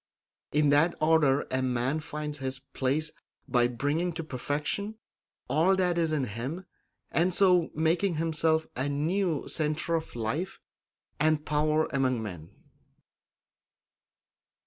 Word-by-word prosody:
In 150 Hz, 0 st, +3 dB
that 155 Hz, +4 st, +4 dB
order 155 Hz, -3 st, +3 dB
a 130 Hz, 0 st, +1 dB
man 130 Hz, +3 st, 0 dB
finds 150 Hz, -1 st, -5 dB
his 130 Hz, 0 st, -3 dB
place 150 Hz, +4 st, -2 dB, 0.4 s
by 120 Hz, -2 st, +3 dB
bringing 145 Hz, +8 st, -1 dB
to 165 Hz, 0 st, -4 dB
perfection 150 Hz, -, -3 dB, 0.5 s
all 175 Hz, +6 st, +3 dB
that 180 Hz, -2 st, +1 dB
is 165 Hz, -2 st, +1 dB
in 150 Hz, -3 st, +1 dB
him, 130 Hz, -, -4 dB, 0.5 s
and 175 Hz, +3 st, +2 dB
so 180 Hz, -2 st, +4 dB
making 165 Hz, +4 st, +1 dB
himself 160 Hz, 0 st, +1 dB
a 130 Hz, +3 st, -1 dB
new 160 Hz, +2 st, 0 dB
centre 155 Hz, +1 st, -1 dB
of 160 Hz, -5 st, -2 dB
life 145 Hz, -, -3 dB, 0.6 s
and 155 Hz, 0 st, +2 dB
power 155 Hz, +1 st, +2 dB
among 130 Hz, -3 st, +1 dB
men. 85 Hz, -6 st, -7 dB
155 Hz, 125 wpm, -28 LUFS, 135-165 Hz, 0.6 s, that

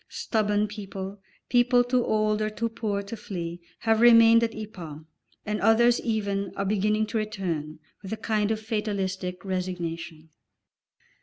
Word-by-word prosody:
Stubborn 210 Hz, -2 st, 0 dB
people, 200 Hz, -1 st, -7 dB, 0.3 s
people 245 Hz, 0 st, +4 dB
too 245 Hz, 0 st, +1 dB
old 215 Hz, -1 st, +1 dB
or 215 Hz, -, 0 dB
too 230 Hz, +2 st, -2 dB
poor 210 Hz, -3 st, -2 dB
to 200 Hz, +3 st, -7 dB
flee, 175 Hz, -5 st, -6 dB, 0.2 s
have 225 Hz, -1 st, +2 dB
remained 230 Hz, -1 st, +7 dB
at 230 Hz, -, -1 dB
Ypres, 175 Hz, -8 st, -8 dB, 0.4 s
and 210 Hz, 0 st, -2 dB
others 235 Hz, +3 st, +5 dB
even 200 Hz, -3 st, -1 dB
are 195 Hz, -, -2 dB
beginning 210 Hz, +2 st, +1 dB
to 220 Hz, +1 st, -2 dB
return, 180 Hz, -8 st, -3 dB, 0.2 s
with 195 Hz, -, -8 dB
a 220 Hz, -, -2 dB
kind 215 Hz, -2 st, 0 dB
of 220 Hz, -1 st, 0 dB
fatalistic 195 Hz, -4 st, -3 dB
resignation. 170 Hz, -4 st, -4 dB
210 Hz, 145 wpm, -26 LUFS, 190-220 Hz, 0.4 s, remained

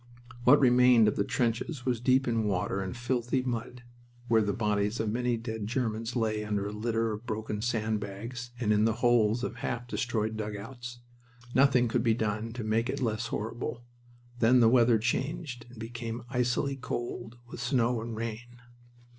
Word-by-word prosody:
What 140 Hz, +4 st, +8 dB
remained 125 Hz, -3 st, +6 dB
of 105 Hz, -, +1 dB
the 100 Hz, -, +1 dB
trenches 120 Hz, +5 st, -1 dB
was 125 Hz, -3 st, +1 dB
deep 130 Hz, +2 st, +3 dB
in 115 Hz, -2 st, +1 dB
water 100 Hz, 0 st, 0 dB
and 95 Hz, +5 st, -5 dB
filthy 125 Hz, +1 st, 0 dB
mud, 120 Hz, 0 st, -4 dB, 0.5 s
where 115 Hz, -1 st, +5 dB
the 105 Hz, -1 st, 0 dB
bodies 105 Hz, 0 st, 0 dB
of 110 Hz, -2 st, 0 dB
many 120 Hz, +1 st, 0 dB
dead 110 Hz, -2 st, -4 dB
Germans 115 Hz, -1 st, -2 dB
lay 110 Hz, -2 st, 0 dB
under 105 Hz, -1 st, -1 dB
a 105 Hz, -, -3 dB
litter 115 Hz, +1 st, -1 dB
of 110 Hz, +3 st, -7 dB
broken 110 Hz, -1 st, -3 dB
sand 110 Hz, -2 st, 0 dB
bags 115 Hz, +5 st, -6 dB
and 105 Hz, -3 st, +2 dB
in 105 Hz, +1 st, +3 dB
the 115 Hz, -, +3 dB
holes 120 Hz, -1 st, +3 dB
of 120 Hz, -, -3 dB
half 120 Hz, +1 st, -3 dB
destroyed 110 Hz, -3 st, -1 dB
dugouts. 115 Hz, +3 st, -6 dB, 0.5 s
Nothing 130 Hz, -2 st, +4 dB
could 115 Hz, +1 st, +1 dB
be 115 Hz, -1 st, +3 dB
done 110 Hz, 0 st, -2 dB
to 120 Hz, -1 st, -5 dB
make 110 Hz, +3 st, 0 dB
it -, -, -2 dB
less 115 Hz, -2 st, -1 dB
horrible. 115 Hz, +2 st, -4 dB, 0.6 s
Then 120 Hz, +2 st, +5 dB
the 115 Hz, -2 st, +6 dB
weather 120 Hz, -1 st, +5 dB
changed 120 Hz, +2 st, -2 dB
and 120 Hz, -, -14 dB
became 115 Hz, +1 st, -5 dB
icily 125 Hz, +2 st, 0 dB
cold, 120 Hz, -2 st, -5 dB
with 120 Hz, -, -9 dB
snow 125 Hz, -3 st, +1 dB
and 115 Hz, 0 st, -5 dB
rain. 115 Hz, +2 st, -6 dB
115 Hz, 175 wpm, -29 LUFS, 110-125 Hz, 0.6 s, What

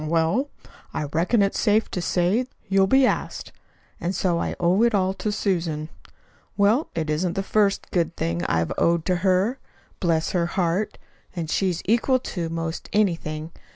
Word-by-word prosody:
"Hm -, -, -5 dB
m; -, -, -4 dB
well, 170 Hz, -, +1 dB, 0.5 s
I -, -, -1 dB
reckon 170 Hz, +9 st, +1 dB
it's 195 Hz, -, 0 dB
safe 215 Hz, 0 st, +2 dB
to 180 Hz, -, -2 dB
say 185 Hz, +9 st, +1 dB, 0.2 s
you'll 195 Hz, 0 st, +3 dB
be 265 Hz, +5 st, +5 dB
asked. -, -, -2 dB, 0.5 s
And 180 Hz, +3 st, -2 dB
so 175 Hz, -3 st, +1 dB
I -, -, -2 dB
owe 180 Hz, +4 st, +3 dB
it 235 Hz, -2 st, +4 dB
all 190 Hz, -1 st, +2 dB
to 195 Hz, +2 st, -3 dB
Susan. 165 Hz, -7 st, -1 dB, 0.7 s
Well, 215 Hz, +9 st, +3 dB
it 160 Hz, -1 st, -1 dB
isn't 170 Hz, +3 st, 0 dB
the 195 Hz, -, -2 dB
first 200 Hz, 0 st, +1 dB
good 170 Hz, -2 st, 0 dB
thing 85 Hz, +1 st, -1 dB
I've 80 Hz, -2 st, 0 dB
owed 170 Hz, -1 st, +2 dB
to 180 Hz, -1 st, +1 dB
her 190 Hz, +7 st, +1 dB, 0.4 s
bless 165 Hz, -2 st, +1 dB
her 170 Hz, -2 st, +1 dB
heart! 180 Hz, +3 st, -1 dB, 0.4 s
And 165 Hz, -2 st, -3 dB
she's 185 Hz, -4 st, 0 dB
equal 235 Hz, +5 st, +3 dB
to 175 Hz, -9 st, -4 dB
'most 165 Hz, 0 st, -4 dB
anything. 165 Hz, -6 st, 0 dB
180 Hz, 175 wpm, -24 LUFS, 165-205 Hz, 0.7 s, be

